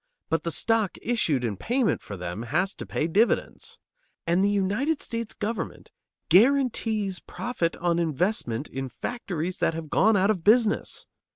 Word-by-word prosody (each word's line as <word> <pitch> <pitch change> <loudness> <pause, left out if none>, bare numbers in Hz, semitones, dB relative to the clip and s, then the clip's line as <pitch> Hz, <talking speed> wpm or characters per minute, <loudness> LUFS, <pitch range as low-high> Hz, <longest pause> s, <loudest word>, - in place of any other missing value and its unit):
But 160 -1 +2
the 170 - -3
stock 225 +3 +1
issued 165 - 0
in 110 -5 -2
payment 240 - 0
for 100 - -8
them 90 +3 -5
has 155 - 0
to - - -8
pay 155 - -1
dividends. 205 +8 0 0.5
And 175 +3 +2
the 200 - +3
United 205 +10 0
States 230 -1 -5
government 220 +2 -4 0.4
guarantees 220 -4 +3
profit 205 -9 -3
on 170 0 0
investment 155 - -1
in 135 0 -5
factories 180 - -4
that 165 - +1
have 160 -2 -7
gone 220 +1 +4
out 195 +2 +3
of 185 -6 -3
business. 220 +1 +3
190 Hz, 155 wpm, -26 LUFS, 160-225 Hz, 0.5 s, gone